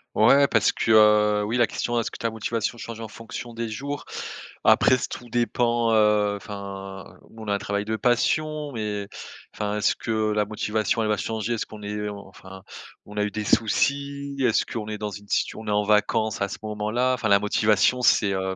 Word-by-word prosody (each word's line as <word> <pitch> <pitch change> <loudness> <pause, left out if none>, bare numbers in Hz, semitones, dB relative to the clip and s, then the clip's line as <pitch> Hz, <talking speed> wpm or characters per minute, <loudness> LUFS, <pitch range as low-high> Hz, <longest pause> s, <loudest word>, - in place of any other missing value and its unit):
Ouais 140 +6 +6
parce 115 -6 +3
que, 115 - 0
heu, 105 -1 +5
oui 115 +4 -1
la 120 -2 +4
question: 120 +3 -2
«Est-ce - - -4
que - - -8
ta 115 - -1
motivation 115 +1 -3
change 115 0 -7
en 110 - -6
fonction 115 +2 -8
des 115 0 -4
jours?» 140 +5 -5 0.6
après - - +6
s 130 - -1
tout 120 - -8
dépend, 120 0 +1
heu, 105 -1 +3
enfin 100 -1 -8 0.2
on 110 -2 -9
a - - +1
un - - 0
travail 100 +1 -2
de 110 +1 -2
passion 150 +6 0
mais 105 -3 -3 0.4
enfin, 105 0 -3
est-ce - - +2
que 110 -1 -1
la 105 0 +1
motivation, 110 +1 -1
elle 110 - 0
va 105 - +2
changer? 110 +1 -2
Est-ce 110 - -3
qu'on 105 -1 -11
est 105 0 -3
enfin 95 -1 -11 0.4
on 105 +1 -11
a 105 - +1
eu 105 - -2
des 105 0 -3
soucis? 140 +6 0
Est-ce 125 -4 +2
qu'on 110 -2 -5
est 105 -1 -4
dans 105 -1 -3
une 100 +1 -10
si - - 0
on 110 0 -9
est - - -2
en 105 0 +2
vacances 110 +1 +1
à 100 - 0
ce - - -7
moment-là? 110 +4 0
Enfin 110 -3 -2
la 100 0 +5
motivation 105 +4 +2
c'est, 105 -3 +4
heu, 95 0 -2
110 Hz, 205 wpm, -24 LUFS, 105-115 Hz, 0.6 s, Ouais